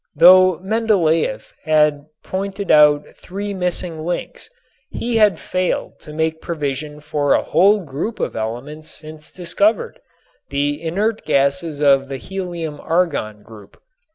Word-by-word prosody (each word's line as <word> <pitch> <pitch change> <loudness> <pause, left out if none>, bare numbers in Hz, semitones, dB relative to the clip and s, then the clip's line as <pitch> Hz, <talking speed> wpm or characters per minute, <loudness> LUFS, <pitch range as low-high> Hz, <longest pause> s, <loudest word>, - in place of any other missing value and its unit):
Though 185 0 +7
Mendeléef 185 - +1
had 150 -2 +2 0.2
pointed 195 +1 -3
out 150 -1 +6
three 200 +2 -6
missing 180 -3 -3
links, 175 +2 -5 0.4
he 235 -1 -2
had 210 -6 +4
failed 185 +2 -2
to 150 - -12
make 160 +1 -2
provision 150 -2 -4
for 145 -1 +1
a - - +1
whole 200 +6 +4
group 160 +8 -5
of - - -2
elements 130 +8 -5
since 155 0 -10
discovered, 200 - 0 0.5
the 145 +2 -1
inert 205 +7 -1
gases 140 +2 0
of 135 -1 +4
the 135 - -4
helium 170 -3 -5
argon 150 -12 -1
group. 105 -3 -15
160 Hz, 125 wpm, -19 LUFS, 145-185 Hz, 0.5 s, Though